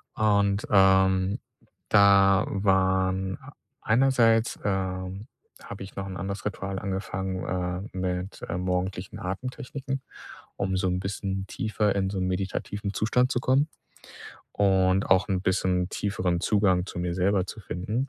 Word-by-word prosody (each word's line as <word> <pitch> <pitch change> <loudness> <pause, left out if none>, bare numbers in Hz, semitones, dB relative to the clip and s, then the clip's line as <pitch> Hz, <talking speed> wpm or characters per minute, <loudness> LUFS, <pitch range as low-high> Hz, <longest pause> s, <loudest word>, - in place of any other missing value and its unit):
Und, 100 -1 +2
ähm, 95 0 +4 0.5
da 100 -1 +6
waren 95 -1 +1 0.4
einerseits, 115 -1 +3
ähm, 95 0 -2 0.4
habe 100 - -8
ich 95 - -12
noch 95 - -4
'n 95 -1 -6
anderes 100 +2 -5
Ritual 95 -1 -3
angefangen, 95 -1 -3 0.5
äh, - - -5
mit, 90 +1 -3
äh, 85 - -2
morgendlichen 90 +1 -2
Atemtechniken, 130 +7 -5 0.6
um 95 -1 -1
so 95 0 0
'n 90 0 0
bisschen 95 0 -3
tiefer 105 -1 -1
in 95 -1 0
so 100 - -4
'nen 90 - 0
meditativen 100 +2 -3
Zustand 125 +5 +1
zu 125 - +1
kommen 135 +5 +2 0.8
und 95 -1 +3
auch 95 +2 +4
'n 95 -2 0
bisschen 90 -1 +1
tieferen 90 -4 -1
Zugang 95 -3 +2
zu 90 - -7
mir 90 0 -1
selber 95 +1 +2
zu 110 - -8
finden. 105 +9 -3
95 Hz, 135 wpm, -26 LUFS, 95-105 Hz, 0.8 s, da